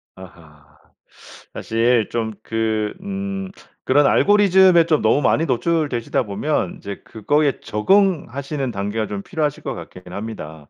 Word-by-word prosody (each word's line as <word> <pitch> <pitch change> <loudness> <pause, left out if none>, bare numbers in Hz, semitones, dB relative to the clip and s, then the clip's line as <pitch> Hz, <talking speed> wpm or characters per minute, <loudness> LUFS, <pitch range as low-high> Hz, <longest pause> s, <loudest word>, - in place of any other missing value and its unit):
아하. 80 -6 -16 0.8
사실 115 0 +1
좀 110 -2 -2
그 110 -1 -1
음 195 0 -4 0.4
그런 145 +2 +4
알고리즘에 190 -4 +5
좀 155 -2 +2
너무 110 +7 +3
많이 160 +4 +2
노출되시다 140 -3 0
보면 100 - -2
이제 100 -1 -8
그거에 145 +6 0
적응하시는 140 - 0
단계가 105 +2 -3
좀 100 -1 -5
필요하실 155 -4 -3
것 - - -3
같긴 90 -1 -11
합니다. 80 -9 -8
120 Hz, 280 characters per minute, -20 LUFS, 105-160 Hz, 0.8 s, 알고리즘에